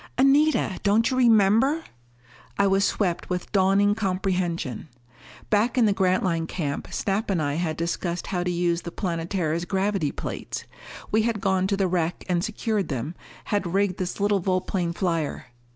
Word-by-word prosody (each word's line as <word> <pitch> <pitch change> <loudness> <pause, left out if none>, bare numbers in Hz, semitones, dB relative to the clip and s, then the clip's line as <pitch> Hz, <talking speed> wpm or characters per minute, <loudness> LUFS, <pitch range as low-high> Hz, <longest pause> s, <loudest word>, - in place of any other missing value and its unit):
"Anita! 275 -5 +3
Don't 215 +4 +3
you 255 - 0
remember!" 235 +6 +4 0.7
I 200 - +3
was 195 0 +3
swept 180 -5 -1
with 180 -1 -3
dawning 200 +1 +3
comprehension. 185 - -2 0.6
Back 220 +4 +2
in 240 - +5
the 205 - +3
Grantline 185 -3 +1
camp 145 -6 -3
Snap 205 +2 -1
and 190 -4 +1
I 145 -2 0
had 160 0 -2
discussed 170 +1 -2
how 180 -2 -2
to 180 - -1
use 175 -1 0
the 170 - -6
Planetara's 170 -2 -2
gravity 195 -5 0
plates. - - -5 0.5
We 220 - +3
had 225 -1 0
gone 190 -2 +1
to 200 0 0
the 195 -1 +2
wreck 175 -1 -1
and 175 -2 +1
secured 215 -1 -1
them, 135 +3 -3 0.4
had 190 -3 0
rigged 195 -2 +1
this 185 +1 -3
little 205 0 +2
volplane 185 -1 -1
flyer.... 165 -6 -2
190 Hz, 160 wpm, -25 LUFS, 170-205 Hz, 0.7 s, in